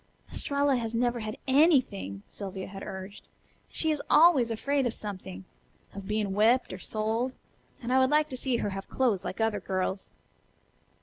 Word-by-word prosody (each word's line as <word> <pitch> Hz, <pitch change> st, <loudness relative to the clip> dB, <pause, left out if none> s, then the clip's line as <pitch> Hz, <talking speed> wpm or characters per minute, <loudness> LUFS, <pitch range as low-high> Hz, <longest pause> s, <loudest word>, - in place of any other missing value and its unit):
"Estralla 280 Hz, -1 st, +1 dB
has 230 Hz, -1 st, -3 dB
never 240 Hz, 0 st, +1 dB
had 215 Hz, -1 st, -5 dB
ANYTHING," 255 Hz, -, +3 dB
Sylvia 190 Hz, -2 st, -7 dB
had 195 Hz, 0 st, -9 dB
urged, 190 Hz, +2 st, -8 dB
"and -, -, -35 dB, 0.4 s
she 320 Hz, -, 0 dB
is 300 Hz, -, -1 dB
always 300 Hz, -7 st, +6 dB
afraid 270 Hz, +4 st, 0 dB
of 235 Hz, -, -3 dB
something. 190 Hz, -2 st, -6 dB, 0.5 s
Of 200 Hz, -1 st, -8 dB
being 210 Hz, -2 st, -1 dB
whipped 225 Hz, +4 st, +3 dB
or 185 Hz, -, -7 dB
sold. 225 Hz, +6 st, -1 dB, 0.5 s
And 245 Hz, +2 st, -1 dB
I 260 Hz, -, +5 dB
would 260 Hz, 0 st, +4 dB
like 300 Hz, +1 st, +3 dB
to 260 Hz, -, -5 dB
see 250 Hz, -1 st, 0 dB
her 205 Hz, -, -2 dB
have 195 Hz, 0 st, -6 dB
clothes 235 Hz, -8 st, +1 dB
like 190 Hz, -, -5 dB
other 220 Hz, -2 st, +1 dB
girls." 190 Hz, +1 st, -2 dB
225 Hz, 175 wpm, -28 LUFS, 195-260 Hz, 0.5 s, always